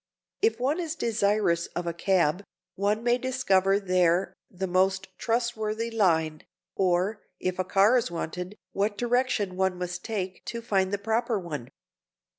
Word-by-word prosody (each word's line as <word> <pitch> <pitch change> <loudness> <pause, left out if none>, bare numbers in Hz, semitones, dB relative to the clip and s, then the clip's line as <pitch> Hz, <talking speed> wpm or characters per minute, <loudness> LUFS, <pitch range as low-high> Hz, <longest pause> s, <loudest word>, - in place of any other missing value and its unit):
If 440 - +2
one 280 +7 +1
is 325 -2 -3
desirous 205 - +1
of 175 - -2
a 170 - -2
cab, 180 -1 +2 0.3
one 205 +4 0
may 245 +1 +3
discover 200 -7 +2
there 180 -1 +2 0.2
the 190 +1 -4
most 190 +1 +1
trustworthy 230 -1 -1
line; 160 -8 +2 0.3
or, 190 +3 +1 0.2
if 185 0 -2
a - - +2
car 195 +5 +4
is 230 - -3
wanted, 180 +3 -5
what 205 +1 -1
direction 240 -5 +1
one 190 -1 +1
must 180 0 -4
take 190 -5 -4
to 235 0 -5
find 195 -4 +1
the 205 - 0
proper 225 +3 0
one. 150 -10 -5
195 Hz, 150 wpm, -27 LUFS, 180-225 Hz, 0.3 s, car